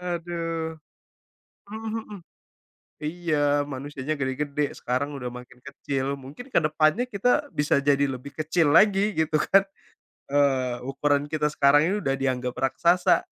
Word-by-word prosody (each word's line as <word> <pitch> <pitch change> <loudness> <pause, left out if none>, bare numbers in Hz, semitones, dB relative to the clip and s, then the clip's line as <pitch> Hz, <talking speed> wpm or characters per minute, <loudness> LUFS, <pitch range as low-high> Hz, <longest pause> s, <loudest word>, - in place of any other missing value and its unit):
Aduh. 165 -2 -4 0.9
Hmm 220 +1 -6
hmm. 210 -4 -7 0.8
Iya, 150 -3 0
manusianya 140 +2 -5
gede-gede, 140 +2 -2
sekarang 135 +4 -2
udah 125 -3 -5
makin 125 0 -12
kecil. 140 0 -3
Mungkin 145 - -11
ke - - +3
depannya 155 +9 +2
kita 245 +6 +1
bisa 150 -1 +2
jadi 140 0 +2
lebih 135 +2 -8
kecil 155 -1 +2
lagi, 205 +2 +4
gitu, 155 -1 +1
kan. 195 +5 +4 0.7
Eee, 135 -3 +2
ukuran 145 +1 0
kita 155 -1 -1
sekarang 140 +1 +5
ini 190 +4 +1
udah 135 -5 0
dianggap 130 -2 -1
raksasa. 170 +7 +3
150 Hz, 130 wpm, -25 LUFS, 140-170 Hz, 0.9 s, sekarang